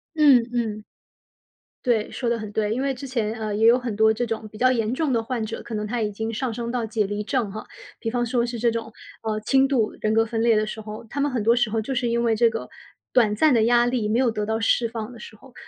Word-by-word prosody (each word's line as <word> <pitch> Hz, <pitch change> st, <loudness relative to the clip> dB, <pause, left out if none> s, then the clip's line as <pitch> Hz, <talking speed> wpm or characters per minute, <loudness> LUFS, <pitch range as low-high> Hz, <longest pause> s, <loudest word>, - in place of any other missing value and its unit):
嗯， 285 Hz, -6 st, +6 dB
嗯。 220 Hz, -3 st, -2 dB, 1.0 s
对， 230 Hz, -4 st, +1 dB
说 245 Hz, -, -3 dB
得 235 Hz, 0 st, +1 dB
很 215 Hz, -2 st, -6 dB
对， 210 Hz, 0 st, 0 dB
因 255 Hz, -, -2 dB
为 275 Hz, 0 st, 0 dB
之 270 Hz, +1 st, -8 dB
前， 230 Hz, -4 st, -1 dB
呃， 215 Hz, -2 st, -3 dB
也 220 Hz, +1 st, +3 dB
有 235 Hz, +2 st, +6 dB
很 245 Hz, -4 st, -4 dB
多 220 Hz, 0 st, +5 dB
这 240 Hz, +2 st, -2 dB
种 225 Hz, -1 st, -4 dB
比 215 Hz, -, -11 dB
较 255 Hz, +2 st, +4 dB
严 230 Hz, -3 st, 0 dB
重 280 Hz, +1 st, 0 dB
的 230 Hz, -, +1 dB
患 230 Hz, 0 st, -3 dB
者， 225 Hz, -, -6 dB
可 230 Hz, -, -7 dB
能 210 Hz, 0 st, -2 dB
他 235 Hz, +1 st, -2 dB
已 210 Hz, -, 0 dB
经 220 Hz, +2 st, -3 dB
上 240 Hz, +2 st, -2 dB
升 235 Hz, +1 st, -4 dB
到 240 Hz, -1 st, -1 dB
解 220 Hz, -2 st, 0 dB
离 205 Hz, +1 st, -3 dB
症 240 Hz, -3 st, -1 dB
哈。 215 Hz, +2 st, -7 dB, 0.3 s
比 225 Hz, -, -3 dB
方 240 Hz, 0 st, 0 dB
说 235 Hz, 0 st, +1 dB
是 240 Hz, 0 st, -4 dB
这 235 Hz, +1 st, +2 dB
种， 225 Hz, 0 st, -5 dB, 0.3 s
呃， 215 Hz, -1 st, -2 dB
轻 265 Hz, +5 st, +3 dB
度 250 Hz, -6 st, +1 dB
人 215 Hz, 0 st, +1 dB
格 225 Hz, 0 st, +3 dB
分 225 Hz, 0 st, -2 dB
裂 230 Hz, -1 st, +4 dB
的 215 Hz, 0 st, +1 dB
时 215 Hz, -, -6 dB
候， 215 Hz, +1 st, -8 dB
他 280 Hz, -, -4 dB
们 290 Hz, +1 st, +1 dB
很 240 Hz, -4 st, -1 dB
多 230 Hz, +3 st, +4 dB
时 240 Hz, -3 st, +1 dB
候 225 Hz, +1 st, 0 dB
就 265 Hz, +5 st, -4 dB
是 250 Hz, -1 st, 0 dB
因 235 Hz, 0 st, +1 dB
为 230 Hz, -2 st, +2 dB
这 230 Hz, +1 st, +4 dB
个 225 Hz, 0 st, -5 dB, 0.5 s
短 220 Hz, -4 st, +4 dB
暂 295 Hz, +6 st, +4 dB
的 225 Hz, -, +4 dB
压 240 Hz, +1 st, +4 dB
力 245 Hz, -4 st, 0 dB
没 220 Hz, +3 st, +1 dB
有 255 Hz, -2 st, +3 dB
得 210 Hz, -2 st, -2 dB
到 220 Hz, +1 st, -1 dB
释 230 Hz, +1 st, +2 dB
放 225 Hz, -1 st, -5 dB
的 240 Hz, -, -12 dB
时 215 Hz, -, -11 dB
候， 260 Hz, +3 st, -18 dB
230 Hz, 300 characters per minute, -24 LUFS, 215-245 Hz, 1.0 s, 嗯